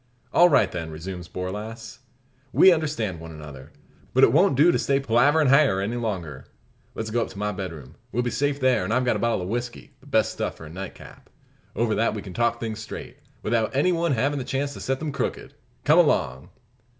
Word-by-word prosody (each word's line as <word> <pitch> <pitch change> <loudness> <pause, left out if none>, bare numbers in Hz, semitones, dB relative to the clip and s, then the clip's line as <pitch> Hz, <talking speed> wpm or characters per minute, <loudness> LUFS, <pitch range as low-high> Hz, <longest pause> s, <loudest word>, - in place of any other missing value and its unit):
"All 175 +1 +7
right, 145 - +3
then," 85 -2 -5
resumes 85 +2 -7
Borlasse; 105 +5 -6 0.5
"we 190 - +7
understand 145 - -2
one 80 0 -9
another. 75 -4 -11 0.4
But - - +5
it - - +7
won't - - +4
do 155 +6 +6
to - - 0
stay 140 0 +1
palaverin 140 +4 +3
hyar 140 -8 +4
any 100 +5 -2
longer. 90 - -4 0.5
Let's 110 -1 -4
go 120 +1 +1
up - - -1
to - - -12
my 105 +1 -1
bedroom. 85 -9 -7 0.2
We'll 120 - 0
be 120 - -2
safe 145 0 0
there; 130 -6 +2
and 95 - -3
I've 125 +2 +2
got 120 - +2
a - - -2
bottle 115 -5 0
of - - -5
whisky, 120 +1 -5
the 140 - -20
best 110 -7 +2
stuff - - -4
for 80 - -11
a 75 - -10
nightcap. 95 +2 -10 0.5
Over 115 -1 +1
that 115 0 +1
we 105 - -5
can 95 - -9
talk 120 +1 0
things 110 -1 -4
straight, 110 - -8 0.3
without 110 +2 0
any 150 +7 +3
one 170 -3 +1
havin' 140 +4 0
the - - -3
chance 140 +2 -2
to - - -9
set 135 0 -1
them 155 +1 -4
crooked. 140 - -4 0.3
Come - - +5
along!" 65 +2 +1
115 Hz, 215 wpm, -24 LUFS, 95-135 Hz, 0.5 s, All